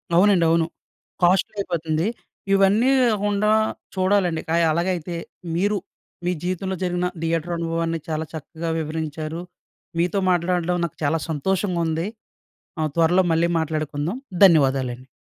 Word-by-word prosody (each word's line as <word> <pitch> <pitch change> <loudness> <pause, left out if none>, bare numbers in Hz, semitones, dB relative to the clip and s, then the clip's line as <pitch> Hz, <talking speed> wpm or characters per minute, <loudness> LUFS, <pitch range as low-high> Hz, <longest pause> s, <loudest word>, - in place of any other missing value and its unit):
అవునండి 185 -2 +5
అవును 165 0 +3 0.6
కాస్ట్లీ 185 +4 +3
అయిపోతుంది. 165 -1 -1 0.5
ఇవన్నీ 195 +6 +4 0.2
‌కాకుండా 205 0 +1 0.4
చూడాలండి 185 -3 +2
క - - -1 0.2
అలాగైతే 170 0 -1 0.4
మీరు 205 +4 +1 0.5
మీ 180 - +2
జీవితంలో 185 +1 -2
జరిగిన 180 0 0 0.2
థియేటర్ 165 +1 -1
అనుభవాన్ని 165 0 -1
చాలా 160 0 -2
చక్కగా 160 +2 -5
వివరించారు. 155 +1 -4 0.6
మీతో 180 +3 +1
మాట్లాడడం 180 0 +1
నాకు 170 - -8
చాలా 155 +3 +2
సంతోషంగా 180 +3 0
ఉం‌ది. 165 +4 -1 0.7
ఆ! - - +1
త్వరలో 175 +3 +4
మళ్ళీ 170 +1 +2
మాట్లాడుకుందాం 155 - -2 0.3
ధన్యవాదాలండి. 130 -6 +3
170 Hz, 115 wpm, -23 LUFS, 160-185 Hz, 0.7 s, అవునండి